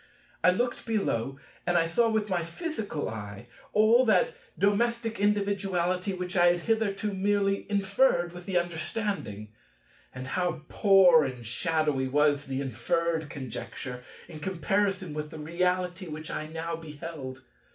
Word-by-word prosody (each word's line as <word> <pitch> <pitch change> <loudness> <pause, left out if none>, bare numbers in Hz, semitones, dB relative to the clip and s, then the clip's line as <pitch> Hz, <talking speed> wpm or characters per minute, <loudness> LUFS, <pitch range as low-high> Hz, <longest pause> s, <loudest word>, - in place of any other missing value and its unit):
I - - +7
looked 240 +7 -1
below, 135 - -1 0.3
and 175 0 +3
saw 230 +8 +3
with 220 -1 0
my 180 -4 0
physical 210 - -4
eye 105 -1 -7 0.3
all 220 +4 +5
that 485 - +3 0.2
domestic 230 +3 +1
individuality 195 -2 +1
which 180 0 -4
I 175 -1 +6
had 175 0 +3
hitherto 215 -2 0
merely 200 +1 +1
inferred 200 -3 +2
with 175 +1 -10
the 190 -2 +1
understanding. 170 - -3 0.6
And 130 0 -7
how 175 -3 -1
poor 190 -6 +6
and 125 -3 -5
shadowy 150 +2 0
was 145 +1 +2
the 135 0 -2
inferred 160 +6 -1
conjecture 125 -1 -6 0.2
in 160 -3 -9
comparison 190 +1 0
with 150 0 -4
the 160 - -9
reality 180 +3 -1
which 155 0 -6
I 155 - -3
now 165 +1 -4
behold! 150 -4 -8
175 Hz, 135 wpm, -28 LUFS, 150-200 Hz, 0.6 s, I